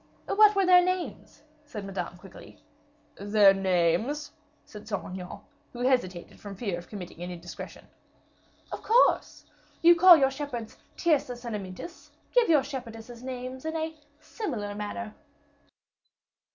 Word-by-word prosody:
"What 425 0 +5
were 390 -1 +3
their 360 0 +7
names?" 360 -4 -4 0.2
said 215 -9 -8
Madame, 195 0 -5
quickly. - - -14 0.6
"Their 205 -1 +5
names?" 195 - 0 0.3
said 210 0 -12
Saint 200 -3 -3
Aignan, 185 +1 -8 0.3
who 240 - -7
hesitated 245 -9 -1
from 200 -1 -8
fear 195 -4 -3
of 175 - -13
committing 180 -5 -9
an 175 - -5
indiscretion. 175 -2 -9 0.9
"Of - - -5
course; 470 +3 +2 0.4
you 340 +1 +9
call 350 0 +9
your 270 -2 +3
shepherds 265 -5 -6 0.2
Tyrcis 270 -7 0
and 230 -2 -3
Amyntas; 195 - -8 0.2
give 485 -5 +4
your 300 -4 +5
shepherdesses 240 -3 -8
names 255 0 -6
in 320 +1 -3
a 320 0 -2 0.3
similar 235 - -5
manner." 210 +2 -5
240 Hz, 135 wpm, -28 LUFS, 200-300 Hz, 0.9 s, you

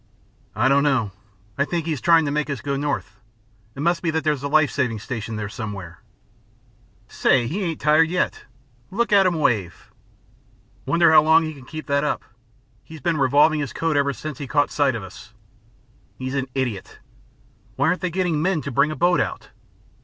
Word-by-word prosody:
"I 120 +4 +2
don't 140 +1 +4
know. 130 -8 +1 0.5
I - - +4
think 170 0 -3
he 165 - -1
is 140 - -6
trying 165 -2 +4
to 140 - -1
make 150 0 -1
us 140 -3 -3
go 140 +4 -3
north. 145 +1 -3 0.6
It 140 - -6
must 170 +2 +1
be 170 - -1
that 160 0 -1
there's 150 -3 0
a 140 - -2
life 155 0 +3
saving 125 -6 -1
station 115 0 -5
there 105 -1 -4
somewhere." 100 - -7 1.1
"Say, 125 -3 +2
he 170 - -3
ain't 165 -5 -3
tired 155 +2 +4
yet. 180 +1 -2 0.4
Look 230 +2 -1
at 195 -2 +6
'im 175 - 0
wave." 105 - -1 1.0
"Wonder 170 -1 +4
how 160 - +8
long 160 +2 +4
he 155 0 -4
can 135 -3 -14
keep 155 +1 -8
that 140 +1 +1
up. 150 - -1 0.6
He's 160 -1 -11
been 170 -2 0
revolving 145 +3 +4
his 145 -3 -4
coat 165 -2 -1
ever 140 0 +2
since 140 +3 -7
he 140 - -5
caught 145 0 +1
sight 140 -4 +1
of 110 - -5
us. 105 +4 -12 0.8
He's 130 0 -5
an 135 -1 -1
idiot. 125 -8 -3 0.8
Why 140 +3 +2
aren't 180 - -1
they 180 - -1
getting 175 -3 -1
men 180 -2 0
to 140 - -5
bring 140 +4 +2
a 155 - -4
boat 175 +5 +2
out? - - -4
145 Hz, 200 wpm, -22 LUFS, 130-160 Hz, 1.1 s, how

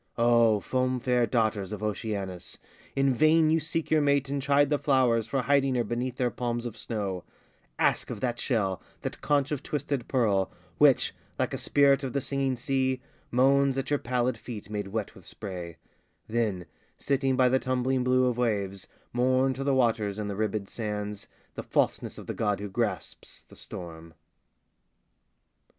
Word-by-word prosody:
O 115 -2 +4
foam 130 0 0
fair 125 -1 +2
daughters 110 -4 0
of 105 0 -5
Oceanus! 100 -4 -4 0.4
In 135 -1 +3
vain 155 +4 +4
you 165 - +4
seek 160 +1 -3
your 155 -1 +4
mate 140 -1 +2
and 140 0 -1
chide 140 +1 +3
the 145 - +2
flowers 125 -5 +2
For 135 +1 -1
hiding 135 0 +2
her 120 - +2
beneath 120 +3 -3
their 125 -1 +1
palms 120 -1 -3
of 115 -3 -5
snow: 100 -5 -4 0.5
Ask - - +1
of - - -5
that 120 -2 -2
shell, 100 -7 0 0.2
that - - -5
conch 145 -1 +1
of 145 - -2
twisted 140 -3 -3
pearl, 105 -7 +1 0.3
Which, - - +5 0.2
like - - -1
a - - -1
spirit 140 -1 +3
of 130 - -3
the 140 - +1
singing 135 -1 -1
sea, 130 +1 0 0.3
Moans 135 +2 +3
at 135 +1 -3
your 145 - +2
pallid 125 +1 -1
feet 105 -4 -8
made 105 -2 -3
wet 105 +1 -3
with 95 - -15
spray: 90 -5 -7 0.5
Then, 110 -6 -1 0.3
sitting 135 -1 +1
by 130 0 +4
the 130 +1 +3
tumbling 130 0 0
blue 130 0 +3
of 125 -1 0
waves, 100 -5 -1 0.3
Mourn 130 +2 +2
to 135 +2 -4
the 140 -1 +2
waters 110 -5 +1
and 105 -1 -3
the 100 - -3
ribbéd 105 -1 -1
sands, 105 -2 -4 0.3
The - - -5
falseness - - 0
of - - -9
the - - -4
god 105 -2 0
who 100 0 -5
grasps - - -4
the - - -18
storm. 85 -2 -9
125 Hz, 175 wpm, -28 LUFS, 105-135 Hz, 0.5 s, Which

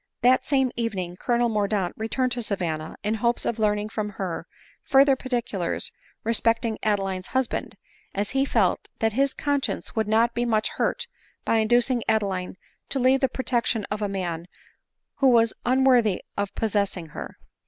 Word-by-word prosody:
That 255 +1 +4
same 265 -3 +2
evening 195 -7 -3
Colonel 240 +4 +1
Mordaunt 205 -4 0
returned 250 +3 -1
to 245 0 -1
Sa 215 -3 -1
vanna, 160 -4 -3
in 210 +1 0
hopes 235 +2 0
of 235 - -1
learning 210 0 +1
from 215 -1 -3
her, 185 -4 -4 0.4
further 275 0 +5
particulars 235 -9 -2 0.3
respecting 230 0 +1
Adeline's 195 -3 -1
husband; 260 -2 -2 0.4
as 200 +1 -1
he 270 0 +2
felt 220 -9 +1
that 225 -1 +1
his 275 +3 +1
con 285 -1 0
science - - -4
would 220 -2 0
not 230 +2 +3
be 240 - 0
much 220 -2 +1
hurt - - -1 0.4
by 225 - +2
inducing 240 +3 +3
Adeline 195 -4 0 0.3
to - - -2
leave 260 +1 +4
the 265 -1 +2
protection 240 -4 0
of 210 +1 -2
a 205 - 0
man 175 -3 -3 0.7
who 275 - +4
was 230 -2 +4
unworthy 250 -6 +4
of 200 -1 -3
pos 220 -2 -1
sessing 195 -5 -1
her. 65 - -8
220 Hz, 165 wpm, -25 LUFS, 200-245 Hz, 0.7 s, further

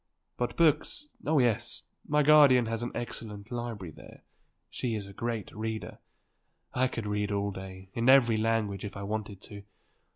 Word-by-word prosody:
But 120 - -3
books; 165 - +2 0.2
oh 155 0 +3
yes; 120 -5 +1 0.2
my 150 0 +3
guardian 140 -5 +7
has 115 0 -2
an 120 - -3
excellent 110 -2 -6
library 115 -8 -4
there; - - -14 0.5
she 120 -3 -2
is 105 -2 -4
a 100 - -11
great 115 -2 -4
reader; 110 0 -4 0.7
I 130 +1 +2
could 115 -3 -5
read 105 0 -1
all 100 0 0
day, 95 0 -9
in 115 +2 +1
every 120 -4 +6
language, 110 -3 0
if 100 -1 -6
I 100 - -5
wanted 105 -1 -4
to. 100 -1 -9
110 Hz, 165 wpm, -29 LUFS, 100-125 Hz, 0.7 s, guardian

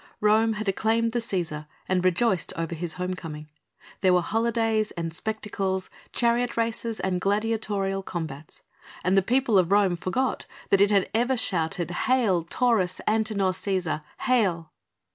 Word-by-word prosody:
Rome 220 +2 +3
had 215 0 -5
acclaimed 225 +4 +1
the 240 - 0
Cæsar 170 -9 -3 0.2
and 185 -1 +1
rejoiced 185 +1 +1
over 165 0 -2
his 165 0 -4
homecoming. 170 -5 -5 0.5
There 185 -2 +4
were 180 - +2
holidays 225 -1 +1
and 165 -1 -3
spectacles, 195 -1 -2 0.2
chariot 240 0 +1
races 230 0 -1
and 185 -1 -1
gladiatorial 205 -2 0
combats, 160 -5 -7 0.4
and 185 +2 +2
the 195 - +5
people 240 0 +3
of 180 0 +1
Rome 200 -3 +4
forgot 190 +9 -2 0.2
that 195 - +5
it 200 - +5
had 200 -3 +3
ever 245 +3 +1
shouted: 170 -4 0
"Hail 200 -3 +2
Taurus 210 -3 +1
Antinor 215 -3 +1
Cæsar! 185 -5 -2 0.2
Hail!" 190 - +1
195 Hz, 145 wpm, -26 LUFS, 180-225 Hz, 0.5 s, the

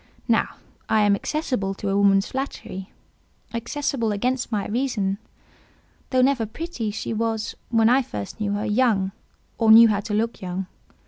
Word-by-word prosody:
Now, - - +1 0.3
I 220 - +4
am 205 -1 +4
accessible 205 -6 -2
to 200 - -4
a 195 - +1
woman's 200 0 +4
flattery—accessible 235 +1 -5
against 245 +5 -1
my 205 -2 -1
reason. 210 -5 -1 0.9
Though 255 -1 +3
never 255 -4 +2
pretty, 250 -2 -4
she 215 +2 -4
was—when 225 0 0
I 255 +3 +5
first 105 - -7
knew 205 -1 0
her—young, 210 -2 +1 0.5
or 225 -2 +5
knew 230 +1 +9
how 205 -2 +1
to 210 +1 -5
look 230 +2 -1
young. 185 +1 -3
220 Hz, 140 wpm, -24 LUFS, 200-245 Hz, 0.9 s, knew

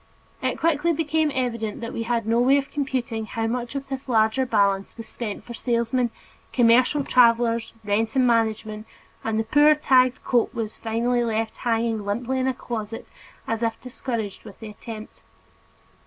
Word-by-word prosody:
It - - -1
quickly 330 +1 +2
became 315 0 +1
evident 230 -5 -2
that 230 +1 -5
we - - -3
had 230 -1 -1
no 230 +1 +2
way 265 +3 +5
of 275 -1 -3
computing 250 -6 -2
how 225 +1 -2
much 240 +2 -3
of 275 0 -4
this 270 0 -6
larger 225 +3 +2
balance 200 -3 +1
was 230 - -8
spent 215 -4 -5
for 240 - -9
salesmen, 235 +1 0 0.4
commercial 250 +4 +4
travelers, 235 -2 +3
rent 220 +3 0
and 260 -1 +4
management, 220 -2 0 0.4
and 220 0 0
the - - +1
poor 295 +7 +5
tagged 255 -4 +3
coat 240 -3 +1
was 220 -2 -3
finally 240 +2 0
left 225 -1 -2
hanging 230 -2 0
limply 240 +6 -2
in 260 - 0
a 260 - +1
closet 225 -3 -6 0.4
as 225 0 -2
if 230 -1 -1
discouraged 235 -5 -5
with 205 -3 -12
the 220 - -8
attempt. 215 +1 -10
235 Hz, 170 wpm, -24 LUFS, 225-255 Hz, 0.4 s, way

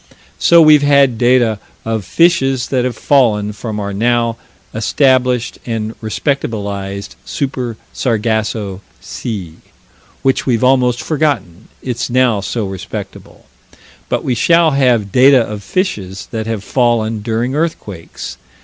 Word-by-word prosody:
So 170 -1 +6
we've 155 -2 +6
had 140 -5 +3
data 120 -3 +3 0.3
of 110 -2 -2
fishes 135 - +2
that 125 -2 0
have 125 -2 -2
fallen 105 -7 +2
from 105 0 -5
our 100 -1 -4
now 115 +2 +1 0.4
established 125 +1 +1
and 110 -2 -3
respectabilized 100 -5 -3
Super 130 -5 -3 0.2
Sargasso 110 -4 -1 0.2
Sea 95 -9 -6 0.7
which 135 0 +1
we've 120 -2 +1
almost 125 -2 +2
forgotten, 135 - -1 0.2
it's 120 -2 -3
now 120 -4 +2
so 105 +2 -3
respectable 95 -1 -8 0.6
but - - -1
we 130 - 0
shall 165 +6 +3
have 125 -7 +2
data 130 +2 +6
of 105 -1 -6
fishes 100 - -3
that 110 -1 -4
have 110 -3 -3
fallen 115 -2 +1
during 115 +4 -2
earthquakes. 140 - -4
120 Hz, 120 wpm, -16 LUFS, 105-130 Hz, 0.7 s, So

